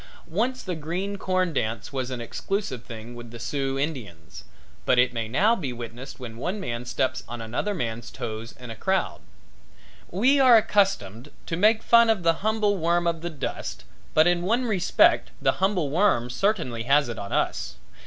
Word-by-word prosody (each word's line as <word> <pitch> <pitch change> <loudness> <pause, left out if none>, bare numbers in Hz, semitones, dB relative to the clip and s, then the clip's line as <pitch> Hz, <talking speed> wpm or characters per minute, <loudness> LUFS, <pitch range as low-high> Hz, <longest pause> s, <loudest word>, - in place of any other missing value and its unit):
Once 235 +10 -1
the 185 - -3
green 175 +6 -3
corn 185 -2 0
dance 110 -1 -2
was 130 -2 -2
an 130 -2 -4
exclusive 130 - -3
thing 115 0 -9
with 120 -1 -10
the 120 - -9
Sioux 135 +3 -2
Indians, 115 - -5 0.4
but 125 - +3
it 125 0 +4
may 115 -2 -2
now 200 - +3
be 145 - -4
witnessed 120 +3 -8
when 115 -3 -8
one 180 - -3
man 120 -9 -4
steps 125 0 -1
on 120 0 -6
another 120 - -2
man's 115 -6 -4
toes 110 +1 -6
in 125 -2 -8
a - - -6
crowd. 190 - -1 0.9
We 255 +10 +3
are 255 -3 +8
accustomed 190 - +1 0.2
to 165 - -2
make 215 +5 +3
fun 235 -1 +6
of 215 -5 +2
the 165 0 +4
humble 215 -1 +1
worm 170 +1 +1
of 165 -1 0
the 175 - -3
dust 155 -4 -5 0.3
but 155 - +6
in 175 0 +3
one 230 +8 +1
respect 200 -6 +3
the - - +1
humble 185 -7 +1
worm 155 - +2
certainly 165 - 0
has 140 +1 +4
it 120 -3 -5
on 100 - -6
us. - - -1
150 Hz, 185 wpm, -25 LUFS, 120-195 Hz, 0.9 s, are